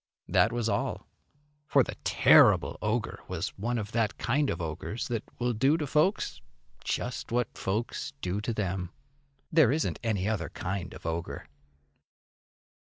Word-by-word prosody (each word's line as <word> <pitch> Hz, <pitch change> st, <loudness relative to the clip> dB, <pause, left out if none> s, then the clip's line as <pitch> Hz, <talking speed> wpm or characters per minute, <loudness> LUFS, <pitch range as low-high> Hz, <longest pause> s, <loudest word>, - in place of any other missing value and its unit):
That 115 Hz, -, +4 dB
was 120 Hz, -1 st, -1 dB
all. 100 Hz, -2 st, -1 dB, 0.6 s
For -, -, +5 dB
the -, -, -5 dB
terrible -, -, +5 dB
ogre 110 Hz, +2 st, -1 dB
was -, -, -2 dB
one 120 Hz, +4 st, -3 dB
of 105 Hz, -1 st, -4 dB
that 110 Hz, -2 st, 0 dB
kind 140 Hz, +4 st, +1 dB
of -, -, -2 dB
ogres 85 Hz, +7 st, -4 dB
that 115 Hz, -2 st, -1 dB
will 120 Hz, 0 st, 0 dB
do 135 Hz, +8 st, +3 dB
to 155 Hz, -, -2 dB
folks 150 Hz, -, +1 dB, 0.4 s
just 125 Hz, -1 st, -3 dB
what 120 Hz, 0 st, 0 dB
folks 105 Hz, +5 st, -2 dB
do 90 Hz, +6 st, -2 dB
to 115 Hz, -, -2 dB
them. 95 Hz, -4 st, -2 dB, 0.6 s
There 155 Hz, -7 st, +5 dB
isn't 155 Hz, +3 st, 0 dB
any 105 Hz, -5 st, 0 dB
other 100 Hz, -9 st, -1 dB
kind 95 Hz, -1 st, -4 dB
of -, -, -12 dB
ogre. 85 Hz, 0 st, -3 dB
110 Hz, 150 wpm, -29 LUFS, 95-120 Hz, 0.6 s, For